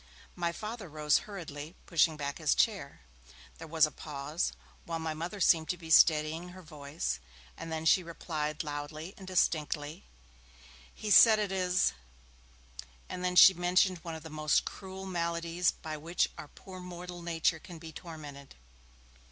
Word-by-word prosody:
My 170 -1 -1
Father 215 +1 -7
rose 150 -1 +2
hurriedly, 160 -4 -7
pushing 165 -3 +2
back 140 +1 -4
his 155 -3 +2
chair. 195 - 0 0.6
There 165 - -8
was 160 0 +4
a 155 - -5
pause, 150 +3 -3 0.3
while 165 -1 -4
my 160 -1 -3
Mother 170 +6 -5
seemed 160 -3 +4
to 180 - -1
be 165 -1 -9
steadying 160 +2 +4
her 185 +1 -12
voice, 145 - -4 0.4
and 165 0 -8
then 160 0 -3
she 185 - +5
replied, 155 -2 -4
loudly 150 +4 -6
and 190 - -12
distinctly, 155 -4 0 0.9
'He 215 - -5
says 220 +1 +9
it 210 -2 -1
is 185 - +2 0.6
' 60 0 -16
and 180 0 -2
she 190 - +10
mentioned 180 +1 +2
one 165 0 -6
of 160 - -9
the 160 - -9
most 155 -1 +1
cruel 190 -1 -7
maladies 170 -1 0
by 155 -1 -5
which 165 +4 0
our - - -9
poor 185 +4 -12
mortal 180 0 -8
nature 165 -1 0
can 175 +1 -11
be 160 0 -10
tormented. 150 -4 -10
165 Hz, 160 wpm, -31 LUFS, 150-180 Hz, 0.9 s, she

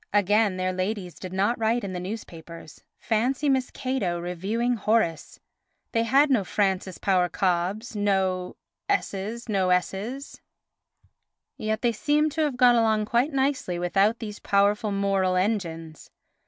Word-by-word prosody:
Again, 205 0 +3
their 185 0 -1
ladies 185 -1 -3
did 185 - -9
not 200 +6 0
write 230 +2 +1
in 195 -2 -4
the 180 - -3
newspapers. 170 -5 -9
Fancy 250 +6 0
Miss 265 -2 +1
Cato 255 -10 -2
reviewing 195 +8 -1
Horace! 215 -7 0 0.5
They 230 - +1
had 275 +5 +3
no 235 -7 +3
Frances 190 -1 -1
Power 185 -2 +1
Cobbes, 190 +6 -1
no... 190 -3 0 0.3
s, 400 - +1 0.3
no... 195 -4 +1
s; 200 - -2 1.2
yet 220 +1 -3
they 240 - +3
seem 300 +7 +1
to 315 - -2
have 290 -5 0
got 245 -1 +6
along 220 -2 +2
quite 240 +7 +1
nicely 265 -9 0
without 195 +6 +2
these 210 -3 -7
powerful 205 +1 +2
moral 195 -2 +1
engines. 170 -5 -2
205 Hz, 140 wpm, -25 LUFS, 185-235 Hz, 1.2 s, got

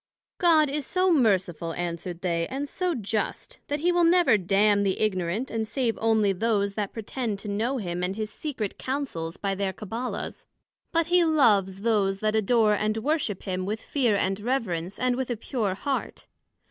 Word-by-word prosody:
God 320 -4 +5
is 290 +1 -2
so 370 -1 +2
merciful, 185 - +1
answered 175 0 -4
they, 170 -2 0
and 275 +2 -4
so 360 +3 -1
just, 215 -2 -3
that 290 0 -2
he 350 +2 +3
will 350 0 +3
never 345 -6 +5
damn 200 +2 +3
the 195 -2 0
ignorant, 195 +3 -1
and 225 -1 -2
save 240 -2 0
onely 220 -3 +3
those 200 0 0
that 205 -1 -3
pretend 225 -1 -3
to 205 - -8
know 225 +6 -1
him 180 -5 -3
and 180 +2 -1
his 215 0 -4
secret 250 -10 -4
Counsels 255 - -3
by 195 -1 -1
their 195 0 -1
Cabbala's; 225 +6 -5 0.4
but 335 -1 +2
he 350 +1 +4
loves 205 - +3
those 200 -3 +1
that 215 0 +1
adore 220 0 +3
and 215 +1 0
worship 265 - -1
him 185 -1 -2
with 210 +4 -2
fear 245 -6 +1
and 195 0 0
reverence, 205 -7 -2
and 255 -1 +1
with 260 0 -3
a 240 - -2
pure 210 -4 -2
heart. 275 +6 -3
215 Hz, 180 wpm, -26 LUFS, 195-265 Hz, 0.4 s, God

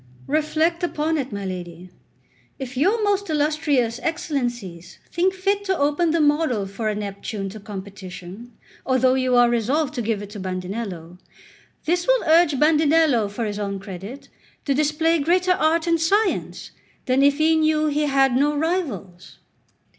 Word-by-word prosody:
Reflect 315 +3 0
upon 320 -2 -1
it, 265 -2 -4
my 200 -1 -5
lady; 180 -1 -7 0.7
if 265 -1 -7
your 390 - +2
most 405 -1 0
illustrious 295 -6 0
Excellencies 245 - -4
think 360 +3 +2
fit 395 +2 -1
to 380 -2 0
open 295 +4 +1
the 330 +1 +1
model 295 -8 +2
for 210 +3 -3
a 210 - -2
Neptune 200 0 -5
to 215 +3 -9
competition, 200 +1 -9 0.3
although 260 -1 +2
you 255 -1 +1
are 245 0 +6
resolved 255 +6 0
to 250 - -3
give 220 -2 -2
it 205 - -10
to 210 - -8
Bandinello, 185 -2 -5 0.7
this 350 +2 0
will - - +3
urge 320 -3 +4
Bandinello 300 -7 +3
for 225 +3 -4
his 205 -1 -4
own 200 -1 -3
credit 195 +7 -9 0.4
to 280 - +1
display 305 +3 +1
greater 360 +5 +2
art 330 -1 +2
and 335 -1 +1
science 400 +5 0 0.3
than 260 0 +2
if 280 0 +4
he 315 +1 +3
knew 310 -1 +2
he 300 0 +1
had 270 -2 +3
no 290 +3 +2
rivals. 275 - -3
275 Hz, 155 wpm, -22 LUFS, 205-320 Hz, 0.7 s, are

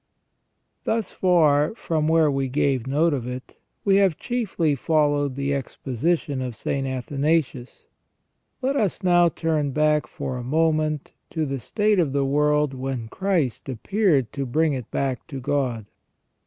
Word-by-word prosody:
Thus 225 -3 -1
far, 155 -2 +3
from 155 -8 -1
where 160 -2 +4
we 135 -1 -1
gave 130 -2 0
note 155 +4 +2
of 125 -4 -3
it, 125 +1 -8 0.3
we 195 -1 +5
have 190 -5 +3
chiefly 205 - -1
fol 150 +2 +2
lowed 145 -2 -1
the 140 +1 -1
exposition 140 +2 -2
of 125 -3 -4
St. 135 +4 -2
Athanasius,* 135 0 -1 0.8
Let 270 +2 +1
us 210 -10 0
now 175 -1 +5
turn 160 -3 -1
back 150 -3 +2
for 130 +1 -5
a 125 - -5
moment 155 +1 0 0.2
to 160 -2 -2
the 135 -1 -3
state 210 - +1
of 150 -6 +1
the 140 -1 +1
world 150 0 +2
when 130 -3 -4
Christ 165 - -1
appeared 140 - +1
to 140 -2 -3
bring 155 +4 +2
it 125 -4 -5
back 135 -3 -2
to 140 -5 -6
God. 130 -5 -1
145 Hz, 155 wpm, -24 LUFS, 135-165 Hz, 0.8 s, we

